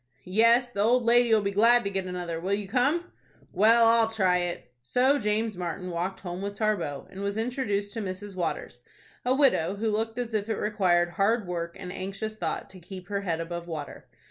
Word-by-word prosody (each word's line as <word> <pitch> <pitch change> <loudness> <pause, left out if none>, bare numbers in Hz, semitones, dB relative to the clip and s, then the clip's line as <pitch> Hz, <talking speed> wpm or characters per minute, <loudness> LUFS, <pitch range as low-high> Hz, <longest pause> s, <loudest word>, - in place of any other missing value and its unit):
"Yes, 230 +6 +4
the 200 - -2
old 240 +3 +3
lady'll 235 -2 +4
be 200 - 0
glad 235 +4 +5
to 200 - -3
get 190 -1 -2
another. 175 -2 -4
Will 190 +4 0
you 205 -1 -5
come?" 280 - +1 0.4
"Well, 230 +3 +5
I'll 230 0 +5
try 190 -5 +2
it." 175 -8 -4
So 255 - +2
James 215 0 -1
Martin 180 +1 -4
walked 175 +3 -3
home 180 0 -5
with 200 0 -4
Tarbox, 195 -10 -1
and 190 - -8
was 200 +1 -2
introduced 220 -4 -2
to 225 - -3
Mrs. 195 0 -6
Waters,—a 180 - -4
widow 205 - +3
who 215 +2 -1
looked 225 +2 -2
as 240 -2 -3
if 215 0 -1
it 220 - 0
required 185 -5 +2
hard 205 +5 +1
work 170 -1 -4
and 180 -1 -6
anxious 195 +3 -5
thought - - -3
to 190 - -12
keep 180 +1 -10
her 200 -1 -1
head 170 -4 -2
above 170 +1 -5
water. 155 -4 -7
200 Hz, 195 wpm, -27 LUFS, 180-225 Hz, 0.4 s, glad